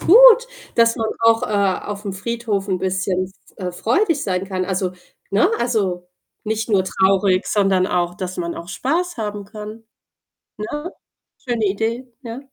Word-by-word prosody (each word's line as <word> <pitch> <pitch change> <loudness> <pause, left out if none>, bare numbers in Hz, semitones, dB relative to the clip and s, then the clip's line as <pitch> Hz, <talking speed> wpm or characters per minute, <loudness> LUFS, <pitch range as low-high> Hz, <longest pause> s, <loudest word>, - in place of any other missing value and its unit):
gut, - - +8 0.3
dass 230 0 +4
man 225 -2 -1
auch, 230 +1 +4
äh, - - 0
auf'm 200 0 -1
Friedhof 210 -1 -2
'n 185 -2 +1
bisschen 185 0 0 0.3
f 185 - -5
äh, 180 - -5
freudig 285 - +1
sein 185 -1 -1
kann. 185 -1 -2
Also, 185 -1 -1 0.4
ne 210 - +4
also, 190 -7 -1 0.4
nicht 220 +1 -2
nur 200 -4 +3
traurig, 190 0 +2
sondern 195 -3 +2
auch, 175 -2 0
dass 185 -1 -5
man 170 -1 -3
auch 170 +1 -8
Spaß 325 - -1
haben 210 -3 -4
kann, 215 +2 -9 0.7
ne? 295 - -4 0.5
Schöne 235 -4 -1
Idee, 225 +5 -2
ja. 235 -1 -6
205 Hz, 155 wpm, -21 LUFS, 190-230 Hz, 0.7 s, gut